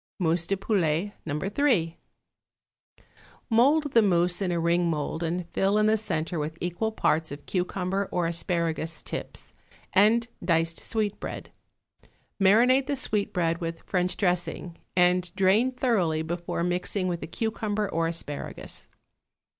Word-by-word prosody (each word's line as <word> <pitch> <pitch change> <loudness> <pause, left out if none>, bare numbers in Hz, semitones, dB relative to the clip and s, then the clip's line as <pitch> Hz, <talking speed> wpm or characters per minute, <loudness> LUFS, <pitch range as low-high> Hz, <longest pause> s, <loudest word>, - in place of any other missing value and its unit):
=Mousse 170 -2 +1
de 195 - 0
Poulet, 190 -2 0 0.2
No. 145 - -1
3.= 195 - +1 1.5
Mould 285 +6 +4
the 230 - +6
mousse 175 -2 +2
in 185 -2 0
a 170 - 0
ring 170 +1 +2
mould 155 +1 -2
and 170 +1 -2
fill 195 +2 +2
in 215 - +3
the 215 +1 +4
centre 170 -5 -2
with 155 +2 -4
equal 180 +6 -2
parts 160 -7 0
of 145 0 -8
cucumber 185 +1 -1
or 175 -1 0
asparagus 165 -2 -1
tips - - -5 0.4
and 225 +4 +4 0.2
diced 165 -1 +1
sweetbread; 215 -3 -3 0.9
marinate 245 +7 +5
the 285 - 0
sweetbread 180 -9 0
with 165 0 -4
French 180 -1 -1
dressing, 175 -2 -1 0.2
and 180 0 +3
drain 205 +7 +3
thoroughly 195 -12 +1
before 170 +1 -3
mixing 180 +2 -1
with 175 -2 -2
the - - -5
cucumber 215 +2 -2
or 165 -2 0
asparagus. 165 -3 -4
180 Hz, 135 wpm, -27 LUFS, 165-210 Hz, 1.5 s, the